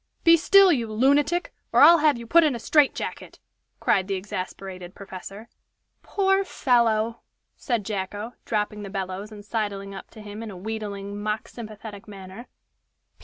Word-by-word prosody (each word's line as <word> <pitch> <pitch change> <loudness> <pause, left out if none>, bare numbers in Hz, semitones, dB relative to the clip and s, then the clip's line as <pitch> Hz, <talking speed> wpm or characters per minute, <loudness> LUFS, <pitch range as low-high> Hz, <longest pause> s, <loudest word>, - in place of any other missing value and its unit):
Be 335 0 +8
still, 390 +3 +6
you 235 -8 0
lunatic, 285 +9 +2 0.2
or - - +4
I'll 340 0 +9
have 300 -3 +3
you 235 - -8
put 335 +8 +5
in 295 -5 +2
a - - -5
strait 295 +4 +3
jacket!" - - -6 0.4
cried 190 -1 +2
the 195 - -1
exasperated 185 -1 -6
professor. 195 +2 -9 0.5
"Poor 385 -1 +1
fellow!" 235 - +1 0.3
said 235 -6 -2
Jacko, 205 +3 -4
dropping 210 -1 -2
the 200 - -7
bellows 195 +1 -5
and 205 -1 -11
sidling 200 -2 -3
up 195 - -9
to 220 - -13
him 210 +1 -8
in 225 - -6
a 190 - -9
wheedling, 205 0 -5
mock 215 +1 -2
sympathetic 215 -2 -10
manner. 195 +3 -10
215 Hz, 160 wpm, -25 LUFS, 200-245 Hz, 0.5 s, I'll